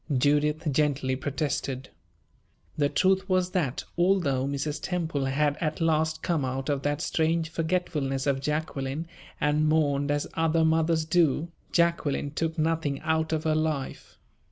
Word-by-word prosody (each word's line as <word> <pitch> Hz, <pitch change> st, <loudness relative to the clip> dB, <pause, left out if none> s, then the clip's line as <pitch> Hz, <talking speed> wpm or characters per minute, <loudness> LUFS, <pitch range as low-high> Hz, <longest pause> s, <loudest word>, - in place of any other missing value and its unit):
Judith 150 Hz, +4 st, +2 dB
gently 140 Hz, -2 st, +1 dB
protested. 135 Hz, -1 st, -3 dB, 0.9 s
The 145 Hz, -2 st, +2 dB
truth 190 Hz, +3 st, +2 dB
was 185 Hz, -1 st, +2 dB
that, 150 Hz, -10 st, -1 dB, 0.2 s
although 170 Hz, -8 st, +2 dB
Mrs. 140 Hz, +2 st, -2 dB
Temple 160 Hz, -6 st, -2 dB
had 145 Hz, +2 st, +1 dB
at 155 Hz, -2 st, -1 dB
last 160 Hz, -1 st, +1 dB
come 165 Hz, -5 st, 0 dB
out 130 Hz, +2 st, -3 dB
of 140 Hz, -2 st, 0 dB
that 145 Hz, +1 st, -1 dB
strange 160 Hz, 0 st, 0 dB
forgetfulness 160 Hz, -5 st, -1 dB
of 135 Hz, -2 st, +1 dB
Jacqueline 150 Hz, 0 st, -2 dB, 0.3 s
and 150 Hz, +1 st, +2 dB
mourned 145 Hz, -2 st, +2 dB
as 145 Hz, 0 st, 0 dB
other 165 Hz, 0 st, +2 dB
mothers 160 Hz, 0 st, +2 dB
do, 160 Hz, -1 st, +2 dB, 0.2 s
Jacqueline 170 Hz, -4 st, +1 dB
took 165 Hz, +2 st, -2 dB
nothing 155 Hz, -3 st, 0 dB
out 160 Hz, 0 st, 0 dB
of 160 Hz, -1 st, 0 dB
her 155 Hz, -, +2 dB
life. 155 Hz, -3 st, -2 dB
155 Hz, 140 wpm, -27 LUFS, 140-165 Hz, 0.9 s, Judith